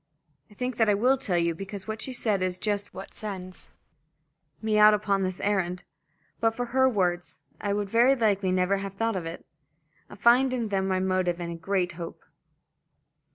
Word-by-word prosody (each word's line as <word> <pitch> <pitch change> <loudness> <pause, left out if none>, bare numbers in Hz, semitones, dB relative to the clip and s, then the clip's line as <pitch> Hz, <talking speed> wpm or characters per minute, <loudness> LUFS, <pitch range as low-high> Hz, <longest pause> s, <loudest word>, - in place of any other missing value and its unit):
I 210 - -18
think 250 +1 -3
that 225 -2 +3
I 205 - +4
will 250 +6 +3
tell 205 -9 -1
you, 170 0 +1
because 195 +2 -8
what 220 0 -4
she 265 - -4
said 220 -6 0
is 185 -1 0
just 205 +1 -2
what 190 - -9
sends 185 -3 -7 0.9
me 215 -1 +1
out 210 0 +8
upon 200 -1 0
this 185 -1 -2
errand. 185 -3 -1 0.6
But 225 0 +1
for 245 - -2
her 260 0 +5
words, 175 - -1 0.2
I 200 -1 -1
would 205 0 -1
very 240 +6 +4
likely 205 -6 +1
never 185 +2 +2
have 195 0 -6
thought 225 +1 0
of 175 -3 -3
it. 165 - -8 0.6
I - - -11
find 250 +5 +4
in 235 -4 -2
them 195 -1 0
my 185 -1 +1
motive 185 -2 0
and 170 -1 -4
a - - -5
great 180 +1 -1
hope. 170 -1 -8
200 Hz, 195 wpm, -27 LUFS, 185-220 Hz, 0.9 s, out